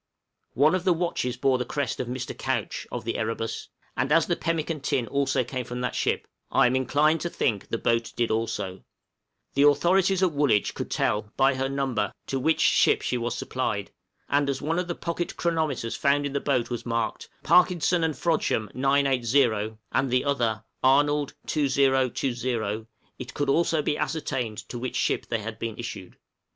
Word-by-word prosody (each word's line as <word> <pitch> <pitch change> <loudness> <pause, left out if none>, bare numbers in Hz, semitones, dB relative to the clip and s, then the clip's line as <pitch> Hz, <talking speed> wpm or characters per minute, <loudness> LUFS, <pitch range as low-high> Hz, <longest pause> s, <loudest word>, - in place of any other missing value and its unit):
One 150 +5 +4
of 185 -1 0
the 185 -2 +4
watches 160 -8 -2
bore 130 0 +2
the - - 0
crest 140 0 -3
of 125 - -2
Mr. 125 +1 -4
Couch, - - -3
of - - -5
the - - -2
'Erebus,' 115 0 -3 0.3
and - - -1
as - - +5
the - - 0
pemmican 160 +2 -2
tin 130 -2 0
also 135 0 +1
came 125 +1 -4
from 125 +1 -6
that 125 - -1
ship, - - 0 0.2
I - - +4
am 125 +1 +2
inclined 150 +4 +2
to 175 - -2
think 110 - -1
the 115 - -2
boat 115 0 0
did 120 -1 0
also; 105 -4 -2 0.7
the 140 - +2
authorities 180 +6 +4
at 180 - +3
Woolwich 140 -9 +2
could - - -5
tell 105 0 0
(by 135 +1 +4
her 135 +1 -1
number) 135 -7 -1
to 135 - -2
which 160 +5 +2
ship - - +4
she - - -1
was 120 0 -2
supplied; 105 -6 -2 0.4
and 145 0 +2
as 135 -1 -1
one 165 +4 -1
of 180 - -2
the 175 - -3
pocket 170 0 -4
chronometers 155 -9 -1
found 145 +1 +2
in 140 - -3
the 140 - +1
boat 130 -4 0
was 120 - -3
marked, 115 -1 -2
"Parkinson 175 0 +4
and 160 -2 0
Frodsham 150 - 0
980," 130 -5 +2
and 130 0 +1
the 125 +2 +1
other 115 -7 0 0.2
"Arnold 145 +2 +3
2020," 130 -5 0 0.3
it 125 - -8
could 145 - -1
also 160 +1 +2
be 150 - -1
ascertained 135 -7 -2
to 120 - -5
which 130 +1 -4
ship - - 0
they 115 -2 -1
had 115 +1 -6
been 115 -1 -4
issued. 115 -6 -7
135 Hz, 185 wpm, -26 LUFS, 115-150 Hz, 0.7 s, as